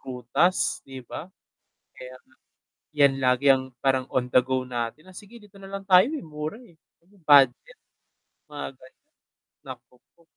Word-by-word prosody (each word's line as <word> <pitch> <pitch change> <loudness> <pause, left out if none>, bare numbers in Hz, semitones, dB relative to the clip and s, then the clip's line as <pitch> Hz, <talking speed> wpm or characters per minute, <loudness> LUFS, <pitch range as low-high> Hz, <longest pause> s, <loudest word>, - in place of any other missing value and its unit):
prutas 125 0 -1
'di 130 -2 -10
ba. 160 +8 -8 0.7
Kaya 130 0 -10
nga 130 0 -31 0.6
'yan 140 -2 +5
lagi 125 +2 +1
ang 130 0 -1 0.2
parang 130 -1 +1
on 130 -1 -1
the 125 - +6
go 130 0 -2
natin 120 +5 -5
na, 185 - -16
sige 210 +5 -13
dito 205 -3 -18
na 195 - -11
lang 195 0 -7
tayo, 190 +6 +5
eh, 310 - -6
mura, 155 +4 -6
eh, 240 -8 -18 0.5
budget. 145 - +4 0.7
Mga 150 -1 -7
ganiyan, 130 0 -21 0.6
naku 125 - -12 0.2
po. 170 - -27
140 Hz, 155 wpm, -25 LUFS, 130-185 Hz, 0.7 s, the